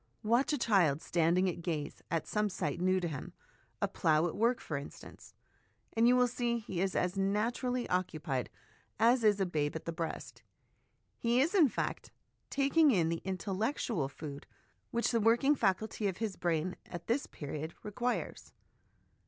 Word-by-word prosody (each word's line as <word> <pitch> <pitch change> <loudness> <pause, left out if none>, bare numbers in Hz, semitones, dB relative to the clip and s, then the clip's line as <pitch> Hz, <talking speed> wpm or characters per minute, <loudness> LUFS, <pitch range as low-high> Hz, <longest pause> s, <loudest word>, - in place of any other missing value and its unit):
Watch 235 +7 +3
a 295 - +1
child 190 - +3
standing 170 +3 +2
at 175 -1 -3
gaze 155 -4 -3
at 165 0 -1
some 210 0 0
sight 160 -4 -3
new 185 +1 +3
to 175 - -2
him 145 -5 -6 0.5
a - - +3
plough 155 0 +2
at 175 - -2
work, 235 +4 +2
for 155 - -5
instance 140 +1 -9 0.6
and 230 +1 +4
you 250 - +6
will 250 0 +4
see 240 0 -1
he 190 -6 -4
is 190 -1 0
as 180 +2 0
naturally 235 +5 0
occupied 155 -8 -1 0.5
as 235 +1 +4
is 210 -2 +4
a 195 - +2
babe 150 -4 -1
at 160 - -5
the 170 - -2
breast; 165 -1 -5 0.8
he 235 +1 +2
is, 305 +8 +2
in 335 -9 +6
fact, - - -3 0.4
taking 285 +3 +4
in 175 -10 +3
the 165 0 -2
intellectual 195 - -1
food 145 -1 -8 0.4
which 235 +1 0
the 230 - +2
working 235 +6 +4
faculty 215 -3 0
of 190 -2 -2
his 220 -4 -2
brain 175 +1 -1
at 170 -1 -7
this 250 +5 0
period 155 +2 -6
requires. 240 +4 -3
195 Hz, 170 wpm, -32 LUFS, 165-235 Hz, 0.8 s, you